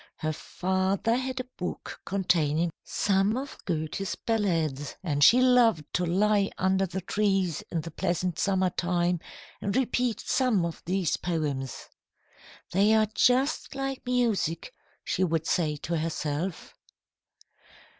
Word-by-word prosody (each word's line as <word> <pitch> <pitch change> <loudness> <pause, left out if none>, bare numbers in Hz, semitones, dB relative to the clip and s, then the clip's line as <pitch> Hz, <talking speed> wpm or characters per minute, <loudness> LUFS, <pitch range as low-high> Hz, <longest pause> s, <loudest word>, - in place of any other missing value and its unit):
Her 155 0 -2
father 190 +7 0
had 260 +1 -2
a - - -1
book 180 - -5
containing 170 -4 +1
some 200 +3 +1
of 275 +2 -5
Goethe's 170 +2 -2
ballads, 165 - -1
and 145 -5 +1
she 240 - +8
loved 240 - +4
to 180 -1 0
lie 200 +3 +2
under 190 +1 +2
the 190 +2 -4
trees 195 -4 0
in 165 - -1
the 165 - -8
pleasant 180 0 -1
summer 190 -2 +2
time 175 0 0 0.4
and 200 0 -2
repeat 250 -2 +1
some 245 -9 +1
of 170 - -5
these 185 -2 +1
poems. 145 -7 -3 0.8
"They 205 +4 +4
are 215 -1 +3
just 265 +5 +2
like 270 -1 -3
music," 220 -10 0 0.3
she 185 - 0
would 165 -2 0
say 155 -4 +1
to 160 +3 -3
herself. 160 +2 -3
185 Hz, 130 wpm, -28 LUFS, 165-215 Hz, 0.8 s, she